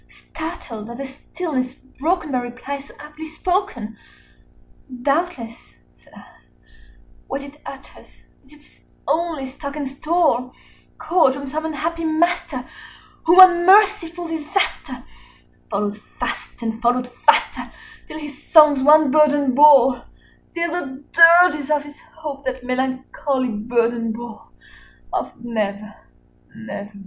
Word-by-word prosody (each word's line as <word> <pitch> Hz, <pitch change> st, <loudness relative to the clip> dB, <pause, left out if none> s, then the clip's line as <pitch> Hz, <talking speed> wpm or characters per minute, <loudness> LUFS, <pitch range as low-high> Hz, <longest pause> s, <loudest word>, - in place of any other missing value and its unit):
60 -, -, -24 dB
Startled 250 Hz, -9 st, -7 dB
at 235 Hz, -, -8 dB
the 275 Hz, -, -5 dB
stillness 265 Hz, -1 st, -5 dB, 0.2 s
broken 320 Hz, 0 st, -1 dB
by 255 Hz, -, 0 dB
reply 250 Hz, +3 st, -6 dB
so 275 Hz, -, -14 dB
aptly 300 Hz, +1 st, -10 dB
spoken, 315 Hz, -, -3 dB, 1.1 s
"Doubtless," 275 Hz, -6 st, -3 dB, 0.2 s
said -, -, -26 dB
I, -, -, -14 dB, 1.0 s
"what 275 Hz, +1 st, -4 dB
it 285 Hz, +1 st, -13 dB
utters 270 Hz, 0 st, -12 dB, 0.4 s
is 270 Hz, -, -24 dB
its 300 Hz, 0 st, -22 dB, 0.3 s
only 320 Hz, -4 st, -1 dB
stock 280 Hz, +2 st, -8 dB
and 290 Hz, -2 st, -4 dB
store, 275 Hz, -3 st, 0 dB, 0.5 s
Caught 320 Hz, -5 st, +2 dB
from 280 Hz, 0 st, -7 dB
some 310 Hz, +3 st, -4 dB
unhappy 325 Hz, +2 st, -3 dB
master 340 Hz, +3 st, -1 dB, 0.6 s
whom 340 Hz, +3 st, +6 dB
unmerciful 360 Hz, -1 st, +5 dB
Disaster 320 Hz, +4 st, -3 dB, 0.7 s
Followed 205 Hz, +1 st, -2 dB, 0.2 s
fast -, -, -5 dB
and 225 Hz, 0 st, -4 dB
followed 245 Hz, +1 st, +1 dB
faster 245 Hz, -, +1 dB, 0.4 s
till 310 Hz, -, -8 dB
his 295 Hz, -3 st, -9 dB
songs 300 Hz, -4 st, +6 dB
one 300 Hz, 0 st, +5 dB
burden 290 Hz, -3 st, +3 dB
bore 265 Hz, -3 st, +6 dB, 0.5 s
Till 340 Hz, -1 st, -1 dB
the 280 Hz, -5 st, -5 dB
dirges 335 Hz, -3 st, +6 dB
of 300 Hz, -1 st, +1 dB
his 290 Hz, 0 st, -14 dB, 0.2 s
Hope 295 Hz, -3 st, -7 dB
that 260 Hz, -1 st, -4 dB
melancholy 260 Hz, +1 st, -2 dB
burden 230 Hz, +1 st, -1 dB
bore 230 Hz, -1 st, -9 dB, 0.6 s
65 -, -, -20 dB
Of -, -, -4 dB
'Never 210 Hz, -2 st, -3 dB, 0.6 s
nevermore.'" 205 Hz, +1 st, -8 dB
285 Hz, 125 wpm, -20 LUFS, 250-320 Hz, 1.1 s, whom